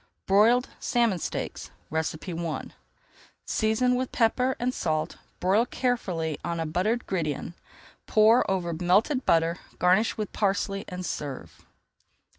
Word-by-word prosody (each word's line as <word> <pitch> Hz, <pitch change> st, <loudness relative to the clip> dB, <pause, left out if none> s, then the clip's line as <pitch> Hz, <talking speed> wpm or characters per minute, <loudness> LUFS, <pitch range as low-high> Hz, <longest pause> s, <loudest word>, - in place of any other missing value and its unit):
BROILED 225 Hz, +6 st, +4 dB
SALMON 235 Hz, -8 st, +1 dB
STEAKS -, -, -4 dB, 0.2 s
I 160 Hz, 0 st, +1 dB, 1.4 s
Season 220 Hz, +3 st, +1 dB
with 255 Hz, 0 st, -1 dB
pepper 250 Hz, +3 st, +2 dB
and 250 Hz, +1 st, 0 dB
salt, 155 Hz, -7 st, -2 dB, 0.2 s
broil 200 Hz, +7 st, +2 dB
carefully 180 Hz, -, -1 dB
on 170 Hz, -1 st, -2 dB
a 165 Hz, -, -1 dB
buttered 190 Hz, +9 st, 0 dB
gridiron, 165 Hz, -3 st, -2 dB, 0.5 s
pour 220 Hz, +2 st, +5 dB
over 180 Hz, -3 st, -1 dB
melted 195 Hz, -, +2 dB
butter, 165 Hz, +1 st, +3 dB, 0.2 s
garnish 185 Hz, +5 st, +3 dB
with 215 Hz, -2 st, -4 dB
parsley, 195 Hz, -1 st, 0 dB
and 180 Hz, 0 st, -6 dB
serve. 130 Hz, -, -6 dB
195 Hz, 115 wpm, -27 LUFS, 170-235 Hz, 1.4 s, pour